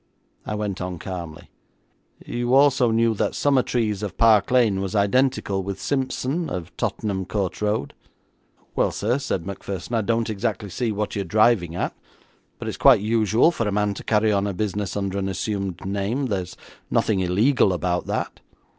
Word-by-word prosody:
I 105 - -2
went 105 -3 -3
on 90 -1 -4
calmly: 85 -2 -7 0.7
'You 120 +1 0
also 135 -3 +5
knew 115 0 +2
that 105 - -1
Summertrees, 120 -7 +1
of 105 -3 -5
Park 110 -3 +5
Lane, 115 -6 +3
was 95 +2 -3
identical 100 -1 +1
with 95 0 -5
Simpson, 135 - -1
of 90 -1 -6
Tottenham 95 0 -2
Court 100 -3 -2
Road?' 105 -9 -1 0.8
'Well, - - +2
sir,' 120 +6 -1
said 95 -10 -2
Macpherson, 100 +1 -6
'I 115 - +2
don't 115 +2 0
exactly 105 -2 -3
see 120 +2 -1
what 105 0 -3
you're 100 - -1
driving 95 -2 +2
at, - - -2 0.6
but - - -7
it's - - -4
quite - - +6
usual 110 - +3
for 115 -10 -2
a - - 0
man 105 0 +1
to - - -8
carry 110 0 +2
on 100 0 +1
a 100 - -3
business 105 0 -2
under 100 -1 -2
an 95 0 -2
assumed 95 -1 -3
name. 100 +8 -1
There 100 -7 -1
is 90 0 -10 0.3
nothing 105 -4 +1
illegal 100 +6 +3
about 90 0 -1
that.' - - -3
105 Hz, 170 wpm, -23 LUFS, 95-115 Hz, 0.8 s, quite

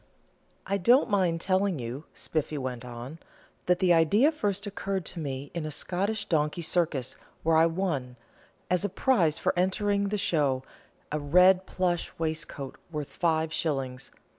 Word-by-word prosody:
"I 200 +1 -1
don't 240 +5 +4
mind 180 -4 +2
telling 190 -1 +1
you," 125 +4 -6
Spiffy 155 -1 -2
went 130 -3 -4
on, 125 +5 -8 0.5
"that 180 0 +4
the 180 -1 +4
idea 200 - +4
first 205 -9 -2
occurred 195 -2 -3
to 180 - -5
me 140 -2 -5
in 170 -2 -3
a 155 - -3
Scotch 200 +7 -1
donkey 155 0 0
circus, 155 -7 0 0.3
where 165 0 +3
I 160 +1 +6
won, 165 -8 -2 0.5
as 180 +1 +1
a 205 - 0
prize 185 - +2
for - - 0
entering 200 +3 +1
the 210 +1 -1
show, 145 -9 +1 0.5
a 150 - -1
red 180 +5 +5
plush 175 -2 -1
waistcoat 160 -4 -4
worth 150 -3 -4
five 160 -2 0
shillings. 135 -6 -2
165 Hz, 155 wpm, -28 LUFS, 150-190 Hz, 0.5 s, I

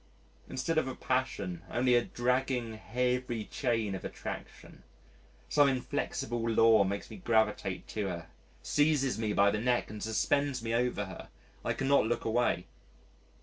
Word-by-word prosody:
Instead 135 +5 0
of 145 - -2
a 130 - -4
passion, 100 -9 -2
only 125 +1 +2
a 120 -1 +5
dragging 125 -1 0
heavy 120 +2 -1
chain 115 -6 -1
of 95 - -5
attraction... - - -7 0.7
some 145 -1 +4
inflexible 135 -2 -2
law 115 -2 +5
makes 100 +1 -3
me - - -8
gravitate 110 - 0
to 105 -2 -2
her, 85 -3 -4 0.4
seizes 145 -5 +2
me 110 -2 0
by 100 0 +4
the 105 - -1
neck 120 -3 +1
and 105 -1 -7
suspends 130 +4 0
me 115 0 -2
over 120 -3 +1
her, 95 - -9 0.4
I - - 0
cannot 135 -4 +3
look 120 - -1
away.... 110 -6 +1
120 Hz, 150 wpm, -31 LUFS, 110-130 Hz, 0.7 s, a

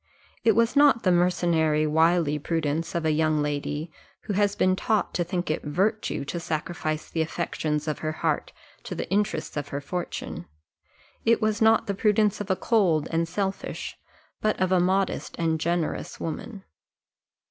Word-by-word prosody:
It 225 -3 +4
was 230 +1 +2
not 280 -5 +5
the 185 - +4
mercenary 170 -3 +2
wily 160 -1 +3
prudence 160 +1 -2
of 170 -1 -1
a 155 - +3
young 155 -1 +2
lady, 150 +2 -3 0.3
who 210 - -4
has 205 +1 +2
been 185 -1 +3
taught 215 +2 0
to 175 - +1
think 175 -1 -2
it 155 - -1
virtue 190 +1 -1
to 170 +4 -3
sacrifice 155 -1 -3
the 165 - -2
affections 155 -2 -2
of 155 - -2
her 155 - -2
heart 155 - -1 0.3
to - - -5
the - - -4
interests 205 -5 0
of 145 -1 -3
her 140 0 -4
fortune 175 +5 -5 0.8
it 230 0 +4
was 215 +1 0
not 225 0 +5
the 200 - -1
prudence 210 +1 +2
of 205 - -6
a 190 - +3
cold 180 -7 +2
and 165 0 +1
selfish, 195 +3 -3 0.5
but 215 - +1
of 185 0 +1
a 185 - +4
modest 190 +2 0
and 160 -1 0
generous 170 0 -2
woman. 190 +6 -5
175 Hz, 170 wpm, -26 LUFS, 155-200 Hz, 0.8 s, not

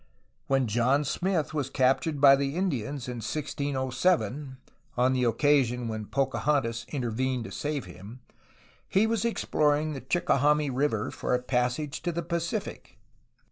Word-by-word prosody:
When 135 -1 +2
John 120 +6 +2
Smith 170 -1 -1
was 145 -4 -2
captured 135 +3 +1
by 140 -1 +8
the 140 +1 -2
Indians 145 - -2
in 125 -1 -5
1607 140 +1 -1 0.4
(on 125 +2 +3
the 130 -1 +1
occasion 125 -1 +2
when 110 -2 -4
Pocahontas 135 -3 0
intervened 130 -1 -2
to - - -8
save 145 -5 -3
him) 95 +7 -11 0.7
he 195 +3 +3
was 225 -2 0
exploring 155 -8 +1
the 135 - -6
Chickahominy 150 -4 +2
River 125 -5 0
for - - -1
a - - 0
passage 125 +3 -1
to 175 - -1
the 170 0 -3
Pacific. 170 +5 -4
135 Hz, 140 wpm, -28 LUFS, 125-150 Hz, 0.7 s, by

